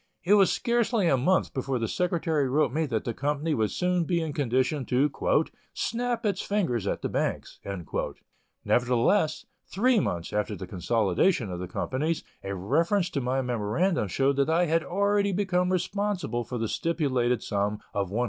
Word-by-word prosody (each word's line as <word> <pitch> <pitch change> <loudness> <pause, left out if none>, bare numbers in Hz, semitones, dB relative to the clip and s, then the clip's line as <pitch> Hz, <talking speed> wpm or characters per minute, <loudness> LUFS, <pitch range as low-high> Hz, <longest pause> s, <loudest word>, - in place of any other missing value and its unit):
It 190 - +4
was 200 -2 +5
scarcely 235 -4 +1
a 135 - +4
month 170 +9 +1
before 135 0 -1
the 115 -1 -1
secretary 160 -3 0
wrote 140 -1 +2
me 160 +1 0
that 115 -5 -1
the 120 - -3
company 150 +5 -1
would 110 -6 +1
soon 180 -1 0
be 170 +1 0
in 160 -3 -3
condition 130 +1 0
to 135 +4 +2 0.6
"snap 240 0 -2
its 200 -3 0
fingers 155 - -1
at - - -2
the - - +1
banks." - - -2 1.1
Nevertheless, 125 - +2 0.2
three 240 +4 +2
months 85 - -2
after 105 0 -1
the 95 - -7
consolidation 100 - +1
of 90 - -4
the 90 - -4
companies, 150 - -2 0.2
a 100 0 -3
reference 165 - +1
to 140 - -1
my 130 +2 0
memoranda 125 - 0
showed 135 +8 +1
that 140 +2 +2
I 170 +2 +3
had 165 0 +1
already 200 +3 +1
become 180 -2 +1
responsible 185 - -1
for 125 - -4
the 115 -1 -1
stipulated 130 -7 0
sum 105 +1 -1 0.2
of 100 -2 -1
$110,000. 105 +5 -2
145 Hz, 170 wpm, -27 LUFS, 120-180 Hz, 1.1 s, was